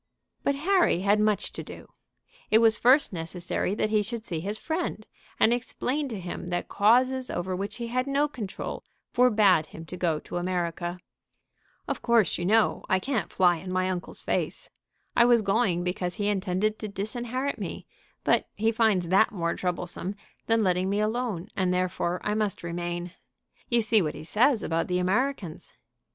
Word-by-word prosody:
But 280 Hz, -, +1 dB
Harry 345 Hz, -, +2 dB
had 205 Hz, +2 st, +3 dB
much 215 Hz, -1 st, +1 dB
to -, -, -6 dB
do. -, -, -11 dB, 0.6 s
It 215 Hz, -, +6 dB
was 225 Hz, -1 st, +4 dB
first 255 Hz, -1 st, +5 dB
necessary 175 Hz, +3 st, -3 dB
that 215 Hz, -, 0 dB
he 215 Hz, -1 st, +3 dB
should 225 Hz, +2 st, -5 dB
see 165 Hz, -3 st, -3 dB
his 200 Hz, +6 st, -3 dB
friend, 315 Hz, -7 st, -3 dB, 0.3 s
and 230 Hz, -, +5 dB
explain 255 Hz, +4 st, -2 dB
to 225 Hz, -6 st, -5 dB
him 180 Hz, 0 st, -6 dB
that 175 Hz, 0 st, -2 dB
causes 255 Hz, +5 st, +3 dB
over 185 Hz, +1 st, -2 dB
which 200 Hz, +3 st, -4 dB
he 240 Hz, -, -5 dB
had 255 Hz, +3 st, -1 dB
no 280 Hz, +2 st, +2 dB
control 220 Hz, -9 st, -6 dB, 0.3 s
forbade 210 Hz, -10 st, +4 dB
him 165 Hz, -, -10 dB
to 180 Hz, -, -8 dB
go 170 Hz, -3 st, +1 dB
to -, -, -6 dB
America. 175 Hz, -1 st, -2 dB, 0.9 s
"Of -, -, -3 dB
course, 230 Hz, -8 st, +3 dB
you 175 Hz, -, -2 dB
know, 220 Hz, +2 st, +3 dB
I 190 Hz, -, +4 dB
can't 245 Hz, +1 st, -2 dB
fly 175 Hz, -2 st, +4 dB
in 185 Hz, +2 st, -7 dB
my 185 Hz, 0 st, +1 dB
uncle's 180 Hz, -1 st, -6 dB
face. -, -, -2 dB, 0.4 s
I 235 Hz, -, +6 dB
was 240 Hz, -2 st, +5 dB
going 195 Hz, -4 st, +1 dB
because 180 Hz, 0 st, -2 dB
he 205 Hz, +1 st, 0 dB
intended 195 Hz, +2 st, 0 dB
to 215 Hz, -, -4 dB
disinherit 240 Hz, +7 st, -3 dB
me; -, -, -5 dB, 0.4 s
but -, -, +2 dB
he 220 Hz, +2 st, +1 dB
finds 215 Hz, -6 st, +2 dB
that 195 Hz, +4 st, +4 dB
more 170 Hz, -4 st, -1 dB
troublesome 180 Hz, +1 st, -3 dB, 0.3 s
than 225 Hz, -1 st, +3 dB
letting 185 Hz, 0 st, +1 dB
me 200 Hz, +1 st, 0 dB
alone, 215 Hz, -4 st, -1 dB
and 185 Hz, -2 st, +1 dB
therefore 180 Hz, -1 st, -1 dB
I 210 Hz, -, 0 dB
must 210 Hz, -4 st, -1 dB
remain. 175 Hz, +1 st, -4 dB, 0.6 s
You 235 Hz, -1 st, +3 dB
see 220 Hz, -1 st, +4 dB
what 155 Hz, -4 st, -2 dB
he -, -, -8 dB
says 225 Hz, -, +2 dB
about 165 Hz, 0 st, 0 dB
the 180 Hz, -, 0 dB
Americans." 195 Hz, -, -1 dB
205 Hz, 175 wpm, -27 LUFS, 180-230 Hz, 0.9 s, It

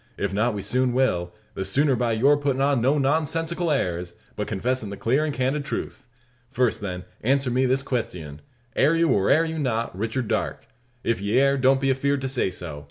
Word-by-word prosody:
If 100 Hz, -1 st, -2 dB
not, 110 Hz, +3 st, +1 dB
we 100 Hz, -, -4 dB
soon 125 Hz, +4 st, +1 dB
will 90 Hz, -10 st, +1 dB, 0.2 s
the 95 Hz, -, -3 dB
sooner 135 Hz, +8 st, +2 dB
by 120 Hz, -2 st, 0 dB
your 135 Hz, +7 st, +4 dB
puttin' 140 Hz, -2 st, -1 dB
on 140 Hz, -2 st, +2 dB
no 135 Hz, +5 st, +3 dB
nonsensical 160 Hz, +4 st, 0 dB
airs, 90 Hz, -, -1 dB, 0.2 s
but -, -, -3 dB
confessin' 125 Hz, +1 st, -2 dB
the 100 Hz, -, -7 dB
clar 135 Hz, +6 st, +1 dB
and 155 Hz, -, -1 dB
candid 135 Hz, +2 st, -1 dB
truth. 140 Hz, -, -5 dB, 0.4 s
First, 125 Hz, -4 st, 0 dB
then, 90 Hz, -3 st, -4 dB, 0.2 s
answer 135 Hz, +2 st, +1 dB
me 130 Hz, +2 st, +2 dB
this 130 Hz, +2 st, +1 dB
questyun: 90 Hz, -, -4 dB, 0.4 s
Air 150 Hz, +4 st, +3 dB
you, 165 Hz, 0 st, +2 dB
or 100 Hz, -1 st, +2 dB
air 160 Hz, +2 st, +4 dB
you 160 Hz, 0 st, -4 dB
not, 115 Hz, -7 st, -1 dB
Richard 110 Hz, +4 st, -2 dB
Darke? -, -, -2 dB, 0.4 s
If 115 Hz, -5 st, 0 dB
ye 100 Hz, +4 st, 0 dB
air, 140 Hz, 0 st, +4 dB
don't 135 Hz, 0 st, +3 dB
be 135 Hz, 0 st, 0 dB
afeerd 140 Hz, +1 st, 0 dB
to 135 Hz, -, -2 dB
say 130 Hz, -7 st, 0 dB
so. 85 Hz, -5 st, -7 dB
130 Hz, 205 wpm, -24 LUFS, 105-140 Hz, 0.4 s, your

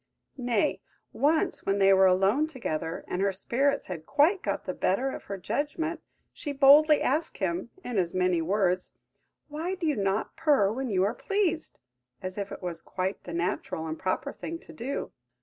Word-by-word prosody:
Nay, 240 Hz, -4 st, +1 dB, 0.3 s
once, 310 Hz, +3 st, +1 dB
when 195 Hz, 0 st, +1 dB
they 195 Hz, -1 st, +6 dB
were 190 Hz, 0 st, +6 dB
alone 195 Hz, +11 st, +3 dB
together, 165 Hz, -, -4 dB
and 180 Hz, -, -2 dB
her 200 Hz, 0 st, +2 dB
spirits 270 Hz, +9 st, 0 dB
had 165 Hz, -4 st, -7 dB
quite 315 Hz, +7 st, +3 dB
got 200 Hz, -1 st, -2 dB
the 185 Hz, -, -2 dB
better 250 Hz, +11 st, 0 dB
of -, -, -8 dB
her 200 Hz, -, -5 dB
judgment, 295 Hz, -, -2 dB, 0.3 s
she 290 Hz, -, -5 dB
boldly 290 Hz, +2 st, +6 dB
asked 305 Hz, +5 st, 0 dB
him, 185 Hz, +2 st, -2 dB
in 245 Hz, -5 st, -1 dB
as 175 Hz, -1 st, -1 dB
many 180 Hz, -2 st, +2 dB
words, 185 Hz, +1 st, 0 dB, 0.6 s
"Why 320 Hz, +5 st, -3 dB
do 355 Hz, -, -4 dB
you 300 Hz, -2 st, +2 dB
not 195 Hz, 0 st, -1 dB
purr 290 Hz, -11 st, +3 dB
when 260 Hz, +3 st, -3 dB
you 190 Hz, -3 st, +2 dB
are 205 Hz, +3 st, +1 dB
pleased?" 360 Hz, -1 st, -1 dB, 0.4 s
as 185 Hz, 0 st, -5 dB
if 200 Hz, -1 st, -4 dB
it -, -, -8 dB
was 175 Hz, -2 st, -4 dB
quite 190 Hz, +1 st, -4 dB
the 175 Hz, -, -6 dB
natural 170 Hz, -2 st, -2 dB
and 160 Hz, 0 st, -5 dB
proper 185 Hz, -, -2 dB
thing 330 Hz, -, -6 dB
to -, -, -13 dB
do. 265 Hz, +4 st, -4 dB
205 Hz, 185 wpm, -28 LUFS, 185-290 Hz, 0.6 s, they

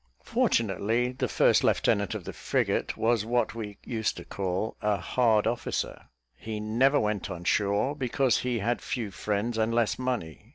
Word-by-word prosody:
Fortunately, 115 Hz, +3 st, +1 dB
the 130 Hz, -, -2 dB
first -, -, +3 dB
lieutenant 100 Hz, -1 st, +2 dB
of -, -, -5 dB
the -, -, -7 dB
frigate -, -, -1 dB
was 115 Hz, -1 st, +2 dB
what 120 Hz, +2 st, 0 dB
we 105 Hz, -3 st, -6 dB
used 115 Hz, -1 st, -1 dB
to -, -, -8 dB
call 95 Hz, +2 st, -2 dB
"a 105 Hz, -1 st, +1 dB
hard 110 Hz, +3 st, +2 dB
officer;" 115 Hz, +1 st, -2 dB, 0.3 s
he 110 Hz, +5 st, -6 dB
never 120 Hz, +7 st, +3 dB
went 105 Hz, -1 st, -1 dB
on 90 Hz, -2 st, -6 dB
shore, 100 Hz, +9 st, +1 dB
because 130 Hz, -2 st, +1 dB
he 125 Hz, -1 st, -1 dB
had 115 Hz, +3 st, -1 dB
few 115 Hz, -5 st, -3 dB
friends 105 Hz, +4 st, -2 dB
and 110 Hz, +1 st, +1 dB
less 120 Hz, 0 st, +1 dB
money. 120 Hz, -6 st, -3 dB
110 Hz, 165 wpm, -28 LUFS, 105-120 Hz, 0.3 s, first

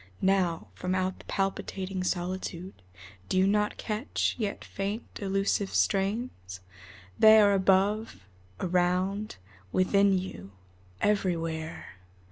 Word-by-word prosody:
Now, 185 Hz, -3 st, +1 dB
From 185 Hz, +1 st, -2 dB
out 185 Hz, 0 st, -1 dB
the -, -, -15 dB
palpitating 195 Hz, -1 st, -2 dB
solitude 185 Hz, 0 st, -3 dB, 0.6 s
Do -, -, +1 dB
you 185 Hz, -, +5 dB
not 210 Hz, +1 st, +1 dB
catch, 215 Hz, +4 st, -1 dB
yet 210 Hz, -3 st, -3 dB
faint, 200 Hz, +3 st, -4 dB, 0.2 s
elusive 195 Hz, 0 st, 0 dB
strains? 195 Hz, -, -1 dB, 0.6 s
They 220 Hz, 0 st, +8 dB
are 205 Hz, -1 st, +5 dB
above, 195 Hz, -, +1 dB, 0.3 s
around, 185 Hz, +3 st, 0 dB, 0.4 s
within 195 Hz, +1 st, +3 dB
you, 100 Hz, -, -7 dB, 0.5 s
everywhere. 165 Hz, -, -1 dB
190 Hz, 100 wpm, -28 LUFS, 180-200 Hz, 0.6 s, They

